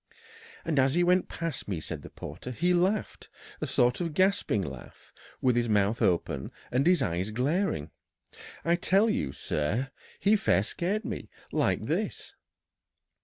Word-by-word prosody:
"And 150 -4 +1
as 135 +2 +3
he 175 - +4
went 180 +1 +3
past 165 -5 -4
me," 95 -5 -2
said - - -6
the - - -10
porter, - - -8
"he 175 +9 +1
laughed 190 +4 0 0.3
a - - -1
sort 125 +6 +2
of 165 -3 -3
gasping 190 - +2
laugh, 75 - -10 0.3
with 125 -2 +3
his 120 -1 +1
mouth 105 +2 +2
open 75 -6 0 0.2
and 130 +5 +2
his 175 -6 +4
eyes 90 0 -1
glaring 125 - 0 0.7
I 170 +1 +3
tell 195 +5 +3
you, 65 - -1
sir, 75 - -2 0.3
he 205 +2 +4
fair 150 - +3
scared 195 - -2
me! - - -5 0.2
like - - +1
this." - - -2
135 Hz, 155 wpm, -29 LUFS, -, 0.7 s, he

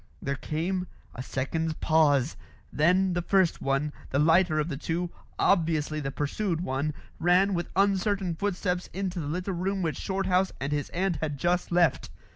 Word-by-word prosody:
There 140 - -2
came 180 +6 -2 0.3
a 125 - -6
second's 155 +5 -2
pause. 150 -4 +3 0.4
Then 180 +5 +3
the 175 - 0
first 185 -1 +2
one, 135 +2 0 0.2
the 140 - 0
lighter 160 +2 +4
of 150 0 +1
the 155 - -3
two, 170 +4 -2 0.3
obviously 160 -4 +2
the 135 -2 -3
pursued 165 +5 -2
one, 140 -1 -2 0.2
ran 185 +3 +4
with 175 -1 -2
uncertain 195 -1 +2
footsteps 180 0 -2
into 185 -1 -3
the 150 - -4
little 180 +5 -2
room 190 +2 -1
which 160 -2 -2
Shorthouse 190 -1 0
and 135 +2 -3
his 145 -1 -1
aunt 185 -1 0
had 150 -3 -3
just 175 +5 0
left. 170 -5 +2
170 Hz, 165 wpm, -28 LUFS, 150-185 Hz, 0.4 s, lighter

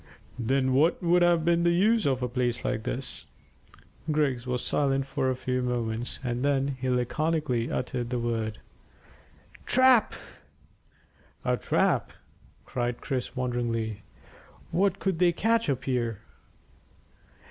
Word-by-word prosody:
"Then 130 +2 +1
what 155 +7 +3
would 175 +1 +4
have 170 -2 +3
been 170 0 +3
the 170 - +3
use 205 +3 +3
of 130 -2 0
a - - +1
place 125 0 -1
like 110 - -1
this?" 130 +4 -5 0.8
Griggs 140 -5 0
was 125 -1 -2
silent 135 -2 +1
for 135 -1 -1
a 130 - 0
few 125 0 -2
moments, 120 -1 -2
and 120 0 -2
then 140 -1 +1
he 130 0 -2
laconically 125 0 0
uttered 125 -1 -2
the 125 - -1
word 115 -2 -2 1.1
"Trap!" 255 -3 +5 1.3
"A - - +2
trap!" - - +1 0.5
cried 120 -1 -2
Chris 130 -2 -3
wonderingly. 115 -4 -2 0.7
"What 195 +1 +2
could 190 -4 -1
they 180 -1 +5
catch 225 +4 +1
up 130 -2 -1
here?" 120 -5 -1
130 Hz, 130 wpm, -27 LUFS, 120-165 Hz, 1.3 s, Trap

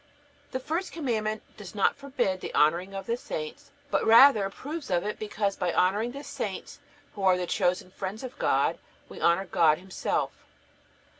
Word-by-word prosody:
The 260 - -2
first 325 +8 -3
Commandment 220 -8 -2
does 205 -1 -10
not 200 - +3
forbid 255 -9 -2
the - - -5
honoring 175 +6 +2
of 195 -1 -5
the 230 - 0
saints, 155 -10 -6 0.2
but - - +2
rather 225 -2 +7
approves 290 +10 -7
of 175 -2 +1
it; 210 - -3
because 205 -2 -1
by 175 - -1
honoring 205 +8 +2
the 280 +3 -8
saints, - - -5 0.3
who 205 - -8
are 185 -1 +4
the 180 - -2
chosen 180 +1 0
friends 195 +5 -5
of 255 -1 -8
God, - - +2 0.3
we - - -10
honor 170 +3 +3
God 155 -4 +4
Himself. 190 +1 -2
200 Hz, 170 wpm, -28 LUFS, 185-245 Hz, 0.3 s, rather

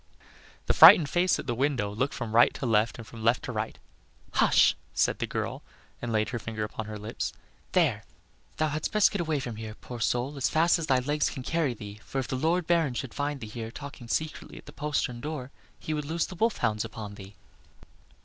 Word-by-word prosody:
The - - +2
frightened 150 -4 +9
face 180 +1 +2
at - - -6
the 120 - -1
window 125 -5 0
looked 130 +6 -1
from 115 -4 -4
right 120 +1 +6
to - - -4
left 110 -1 +2
and 115 - -9
from 110 0 -10
left 115 +2 +3
to - - -4
right. - - -3 0.5
"Hush," - - +4 0.2
said - - +2
the - - -1
girl, - - -3 0.4
and 120 - -3
laid 110 -1 +1
her 120 - -3
finger 110 -1 -4
upon 110 0 -5
her 105 0 -6
lips. 105 +3 -4 0.4
"There! - - +2 0.5
thou 155 0 +1
hadst 155 +1 -2
best 215 -1 +4
get 205 - -1
away 155 -3 0
from 120 -4 -5
here, 110 -1 -7
poor 120 0 -9
soul, 125 +5 0
as 135 - +1
fast 165 +2 +3
as 160 - -3
thy 130 -3 +4
legs 145 +4 0
can 130 - -7
carry 155 -4 0
thee, 105 -1 -9
for - - -6
if 135 - -1
the - - -2
Lord 165 +6 +1
Baron 165 -6 +2
should 130 -1 -4
find 145 -1 -2
thee - - -5
here 110 +1 -6
talking 135 -1 -9
secretly 155 +6 -3
at - - -12
the - - -12
postern 140 -4 -2
door, 145 -3 -5 0.3
he 155 - -4
would 150 -1 -2
loose 165 +3 -1
the - - -9
wolf 220 +6 +1
hounds 105 -1 0
upon 110 -2 -7
thee." 100 0 -12
130 Hz, 225 wpm, -28 LUFS, 115-150 Hz, 0.5 s, frightened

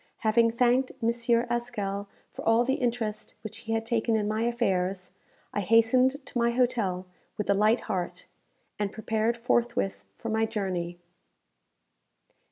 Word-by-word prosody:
Having 230 +1 +4
thanked 250 +2 +3
M. 230 - +4 0.4
Haskell 210 -5 -3 0.2
for - - -8
all 225 +2 +4
the 265 - +2
interest 230 -3 -2
which 215 +1 -7
he 225 -1 -4
had 225 0 -1
taken 230 0 +1
in 210 -1 +1
my 215 +1 -1
affairs, 195 -6 0 0.4
I - - 0
hastened 250 +7 +3
to 260 - -5
my 235 0 +3
hotel 235 -7 +1 0.3
with 210 - -2
a - - +6
light 215 +4 +3
heart, 180 -2 -3 0.5
and 205 -1 -1
prepared 220 +2 0
forthwith 230 - 0
for 230 - -5
my 220 0 +1
journey. 180 -5 -3
225 Hz, 145 wpm, -28 LUFS, 200-235 Hz, 0.5 s, a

